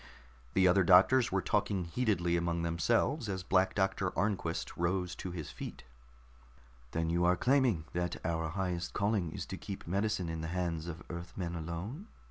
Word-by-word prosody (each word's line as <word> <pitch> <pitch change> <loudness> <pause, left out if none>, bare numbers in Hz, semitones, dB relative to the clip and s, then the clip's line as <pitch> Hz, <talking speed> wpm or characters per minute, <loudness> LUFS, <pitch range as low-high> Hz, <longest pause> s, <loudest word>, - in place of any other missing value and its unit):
The 95 -1 +5
other 95 +2 +5
doctors 100 +8 +6
were 95 0 +1
talking 100 -3 +1
heatedly 90 -3 +1
among 85 0 0
themselves 115 - +1
as 95 -2 -3
Black 95 +1 +2
Doctor 95 -1 +1
Arnquist 90 -3 -1
rose 90 +1 0
to 95 - -5
his 80 -4 -6
feet. - - -7 1.1
"Then 80 +4 -1
you 85 +1 +2
are 90 +1 +4
claiming 125 - +3
that 90 -1 -1
our 80 -1 -1
highest 90 -1 -2
calling 100 -5 0
is - - -5
to - - -6
keep 100 - -7
medicine 100 0 0
in 80 -1 -3
the 80 - -3
hands 85 -2 -2
of 85 0 -6
Earthmen 85 +1 -5
alone?" 85 - -5
90 Hz, 165 wpm, -32 LUFS, 85-100 Hz, 1.1 s, doctors